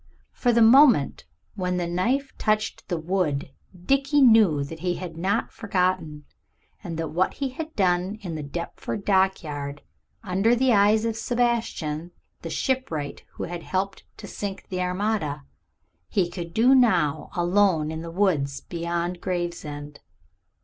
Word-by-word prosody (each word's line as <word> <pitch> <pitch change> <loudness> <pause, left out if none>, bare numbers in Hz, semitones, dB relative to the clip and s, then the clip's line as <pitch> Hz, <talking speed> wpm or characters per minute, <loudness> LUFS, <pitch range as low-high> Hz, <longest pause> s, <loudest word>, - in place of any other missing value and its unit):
For 245 - -1
from 240 - +3
the 235 - +5
moment 240 - +5 0.3
when 180 -2 -2
the 175 - -1
knife 240 +11 -1
touched 215 0 -1
the 175 - -1
wood 160 -5 -1 0.3
Dickie 275 +3 +3
knew 215 - +5
that 160 +3 -8
he 175 +1 -1
had 175 -3 -7
not 185 +5 -1
forgotten, 180 -7 -1 0.6
and 170 -4 -5
that 165 -1 -3
what 180 +4 0
he 275 -2 -2
had 315 +4 -7
done 185 0 +1
in 175 -4 -4
the 155 - -4
Deptford 170 +6 -5
dockyard 155 -8 0 0.4
under 200 +4 +2
the 255 0 +3
eyes 210 +2 +4
of 225 -1 -1
Sebastian, 225 -10 -1 0.3
the - - -6
shipwright 210 - -2
who - - -6
had 175 0 -5
helped 195 +3 -3
to - - -9
sink 195 -1 -6
the 185 -1 -2
Armada, 180 -6 -1 0.7
he 185 -4 +1
could 170 -2 -6
do 240 +8 +4
now 185 - +3
alone 175 -3 +2
in 160 0 -5
the 165 - -7
woods 165 -7 0
beyond 170 +1 -3
Gravesend. 150 -5 -4
180 Hz, 150 wpm, -25 LUFS, 165-215 Hz, 0.7 s, the